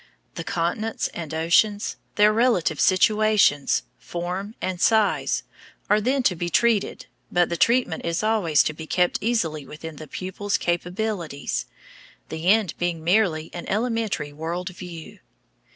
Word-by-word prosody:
The 165 - -5
continents 200 +5 -2
and 165 -4 -7
oceans, 195 +7 +2 0.2
their 210 0 +5
relative 220 - +2
situations, 210 -6 +3 0.2
form, 180 +5 -5
and 185 -1 -3
size, 220 -2 +2 0.5
are 210 +1 +4
then 260 +4 +1
to 185 - +2
be 175 +1 -3
treated, 225 - +1 0.3
but 175 -1 +3
the 170 - -1
treatment 235 -4 +2
is 170 +4 -1
always 210 -9 +3
to 155 - -1
be 160 +1 -9
kept 180 +1 +1
easily 170 -10 0
within 155 +2 -9
the 155 - -9
pupil's 190 +6 -3
capabilities 175 - -2 0.6
the 160 +2 -4
end 205 -3 +4
being 175 -2 -2
merely 170 -4 +1
an 175 - -6
elementary 220 -9 -1
world 170 +4 -4
view. 175 -3 -10
180 Hz, 135 wpm, -24 LUFS, 165-215 Hz, 0.6 s, their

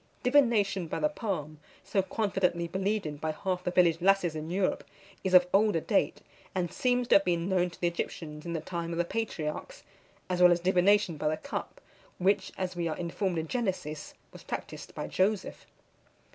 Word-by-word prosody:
Divination 230 - +3
by - - -3
the 300 - +2
palm, 170 - -4 0.2
so 195 - +1
confidently 190 -4 0
believed 195 +4 -1
in 150 -1 -4
by 155 +1 -2
half 180 +2 -2
the - - 0
village 175 -2 +3
lasses 195 -3 +3
in 155 +1 -5
Europe, 185 +2 0 0.4
is 185 -1 +2
of 180 0 +8
older 205 -3 +4
date, - - 0 0.3
and 175 -2 -1
seems 250 -1 +1
to - - +7
have 195 - -1
been 170 -1 0
known 180 -2 +2
to - - -15
the 175 - +1
Egyptians 150 -2 -5
in 170 - -4
the 165 - -2
time 170 0 -4
of - - -4
the 175 - +1
patriarchs; 225 - -4 0.4
as 180 -1 -1
well 180 0 +8
as 175 - +3
divination 185 0 +3
by 150 - -1
the 155 +1 +1
cup, - - -6 0.4
which, 190 +1 +1
as 185 -1 -3
we 170 -1 -1
are 155 - -3
informed 175 +1 -2
in 160 0 -2
Genesis, 185 - -3 0.2
was - - -12
practised - - -7
by - - -3
Joseph. 200 +2 -1
180 Hz, 190 wpm, -29 LUFS, 170-195 Hz, 0.4 s, of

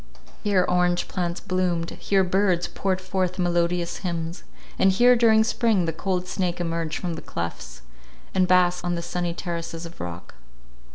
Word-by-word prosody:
Here 195 -3 +3
orange 180 0 +2
plants 175 -1 -2
bloomed, 180 -2 -1
here 195 -1 +1
birds 185 -1 +1
poured 190 -1 -1
forth 185 -1 -2
melodious 175 -1 0
hymns; 170 -1 -4 0.4
and 190 - +5
here, 245 +6 +5
during 225 -2 +5
spring, 220 -5 +1
the 165 - -1
cold 180 +2 -2
snake 180 -2 -2
emerged 165 -2 -2
from 175 -2 -3
the 160 - -6
clefts, 75 -7 -6 0.5
and 185 -1 +3
basked 180 -1 +3
on 175 0 -1
the 170 - -4
sunny 175 -1 -2
terraces 170 -1 -5
of 170 - -11
rock. 85 0 -7
180 Hz, 160 wpm, -24 LUFS, 170-185 Hz, 0.5 s, and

